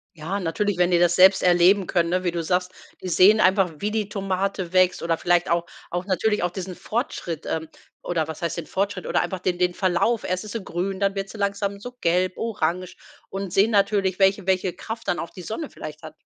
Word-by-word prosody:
Ja, 170 +6 -3
natürlich, 190 +3 -1
wenn 180 0 +3
die 175 - +5
das 175 0 +3
selbst 190 +1 +6
erleben 180 +2 +5
können, 170 -1 +1
ne? 185 +1 0
Wie 175 - 0
du 170 - -2
sagst, 180 +2 0 0.3
die 185 - -4
sehen 205 +5 +6
einfach, 185 -2 +3
wie 205 +6 -2
die 215 -2 -2
Tomate 195 -2 -2
wächst, 185 -1 +3
oder 165 -1 0
vielleicht 175 +1 +2
auch 170 0 +1 0.3
auch 175 +1 -2
natürlich 210 +2 +1
auch 175 - +1
diesen 185 0 -6
Fortschritt 180 - -4
ähm, 160 -1 -3 0.3
oder 165 -3 -1
was 160 -1 -7
heißt 170 0 -2
den 170 - -4
Fortschritt, 195 -1 -2
oder - - +1
einfach 180 +1 -3
den 180 0 -1
den 180 0 +2
Verlauf. 190 +5 +1
Erst 185 +2 -2
ist 215 0 -8
sie 225 - -4
grün, 190 +2 -3
dann 200 -1 +1
wird 195 0 -3
sie 220 - -10
langsam 200 0 -2
so 245 +4 -8
gelb, 180 +2 +2
orange 185 -5 -2 0.3
und 195 -2 -5
sehen 200 +3 +4
natürlich, 200 -2 +2
welche 195 0 +2
welche 185 -2 +1
Kraft 225 +4 -7
dann 175 - 0
auch 170 - -5
die 185 - -11
Sonne 250 - -5
vielleicht 155 +1 -9
hat. 155 0 -10
185 Hz, 225 wpm, -24 LUFS, 175-200 Hz, 0.3 s, selbst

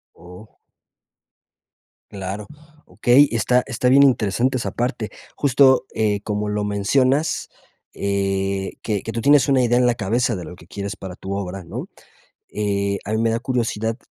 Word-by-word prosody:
¡Oh! 90 +5 -14 1.5
Claro, 100 +1 -6 0.4
okey, 120 +9 +4
está 120 +2 +2
está 125 0 0
bien 140 +2 +7
interesante 125 0 +2
esa 120 - -3
parte, 120 -3 -2 0.3
justo 130 -2 +4
eh 105 -2 +1
como 105 0 -2
lo 105 0 -1
mencionas, 130 +9 +1 0.4
eh, 95 -1 -1
que 105 -3 -1
que 115 - -5
tú 115 - -3
tienes 145 +2 +5
una 130 -2 +4
idea 120 0 +2
en 125 - +3
la 120 - +2
cabeza 115 +2 0
de 90 - -6
lo 90 - -9
que 85 - -17
quieres 100 +2 -5
para 95 -2 -8
tu 95 +1 -6
obra, 95 -1 -5
¿no? 85 - -7 0.6
Eh, 100 -1 -1
a 105 - -4
mí 110 - +1
me 115 0 +2
da 115 - 0
curiosidad 115 -3 -2
110 Hz, 160 wpm, -21 LUFS, 100-125 Hz, 1.5 s, bien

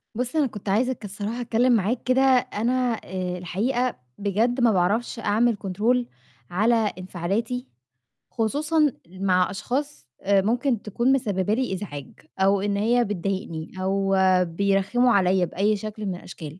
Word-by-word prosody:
بُص، 250 +5 -3
أنا 295 -4 +3
كنت 210 -3 -7
عايزة 250 +6 +2
ك 215 - -11
الصراحة 210 +5 -4
أتكلِّم 240 +2 +2
معاك 225 +3 0
كده، 255 +1 +2
أنا 250 -1 +2
آآ 180 -1 -4
الحقيقة 235 +8 -1 0.2
بجد 220 +5 0
ما 235 -2 +5
باعرفش 205 +6 0
أعمل 225 +2 +2
كنترول 215 +6 0 0.4
على 215 +7 +3 0.2
انفعالاتي، 195 +7 -3 0.6
خصوصًا 295 +6 +1 0.2
مع 185 0 +1
أشخاص 250 - -4
آآ 195 0 +3
ممكن 235 +2 0
تكون 235 +5 +1
مسبّبة 205 -6 0
لي 250 -3 -1
إزعاج 145 -8 -6 0.3
أو 195 +1 +3
إن 200 0 -1
هي 235 +4 +3
بتضايقني 190 -5 -4
أو 195 +1 +1 0.3
بيرخّموا 200 +7 +1
عليّا 185 -1 +3
بأي 205 +5 +1
شكل 215 +1 -6
من 190 -2 -2
الأشكال. 165 -2 -10
210 Hz, 140 wpm, -24 LUFS, 190-245 Hz, 0.6 s, ما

